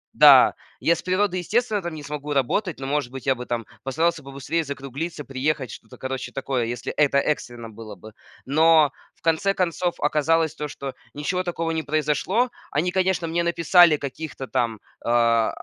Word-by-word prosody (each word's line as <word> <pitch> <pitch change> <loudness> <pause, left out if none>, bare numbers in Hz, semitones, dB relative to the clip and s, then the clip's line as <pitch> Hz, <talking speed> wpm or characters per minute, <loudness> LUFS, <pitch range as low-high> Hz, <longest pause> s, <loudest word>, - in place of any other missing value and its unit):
Да, - - +8 0.3
я 170 - +3
с - - -7
природой, 185 0 0
естественно, 215 +2 0
там 175 -2 -5
не 150 - -8
смогу 150 0 -5
работать, 145 - 0
но, 135 - -5
может 140 -3 -1
быть, 135 -1 -8
я 135 - +4
бы 125 -1 -8
там 115 -2 -2 0.2
постарался 160 +3 0
побыстрее 140 +4 -3
закруглиться, 140 +3 -6
приехать, 135 -2 -2
что-то, 115 - -12
короче, 130 0 -5
такое, 135 -3 -2
если 120 +1 -4
это 140 -2 +3
экстренно 120 -5 -2
было 110 0 -10
бы. 110 0 -13 0.3
Но 155 +1 +5 0.2
в - - -34
конце 165 +5 +2
концов 175 -1 0
оказалось 160 +1 +2
то, 150 -2 -5
что 140 -2 -7 0.2
ничего 150 +6 -1
такого 165 -2 -2
не 160 -1 -1
произошло. 155 - 0 0.2
Они, 165 +5 0
конечно, 185 -1 +1
мне 165 +1 0
написали 170 -1 +5
каких-то 140 0 -6
там, 115 -4 -1 0.2
а, 115 -1 +3
150 Hz, 175 wpm, -24 LUFS, 135-170 Hz, 0.3 s, Да